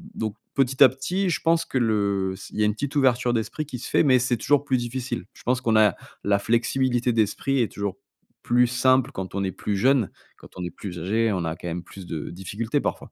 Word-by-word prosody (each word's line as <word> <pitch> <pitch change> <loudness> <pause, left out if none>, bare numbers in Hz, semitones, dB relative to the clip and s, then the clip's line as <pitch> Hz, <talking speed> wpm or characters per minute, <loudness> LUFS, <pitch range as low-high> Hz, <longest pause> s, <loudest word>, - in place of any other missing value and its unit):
donc 110 -2 -3 0.2
petit 135 0 +4
à 130 - +9
petit, 180 +9 -2
je 170 - 0
pense 165 0 +2
que - - -3
le 100 -4 +1
s 95 - -10
il - - -9
y - - +4
a - - +4
une 105 - +2
petite 140 +6 -4
ouverture 125 -3 +3
d'esprit 120 +7 -2
qui 130 - -6
se - - -7
fait, - - +3
mais 130 -4 +5
c'est 125 -1 0
toujours 145 +4 +2
plus 130 -2 +2
difficile. 120 -2 -4
Je - - -17
pense 125 +1 +1
qu'on 115 -2 +1
a 105 -3 +5 0.3
la 100 0 +2
flexibilité 120 +2 +1
d'esprit 120 +4 +1
est 115 - -1
toujours 100 -2 -3 0.5
plus 120 +1 +4
simple 130 +2 +3
quand 95 -6 -6
on 100 - 0
est 95 - -1
plus 100 +2 -3
jeunes. 130 0 +3 0.3
Quand - - -15
on 90 - -4
est 90 - -5
plus 90 0 -7
âgés, 110 +5 +1
on 90 -4 -1
a 80 0 -2
quand 90 - -8
même 85 +1 -4
plus 95 +2 -11
de 80 -4 -5
difficultés 105 +9 -2
parfois. - - -4
115 Hz, 245 wpm, -24 LUFS, 100-130 Hz, 0.5 s, à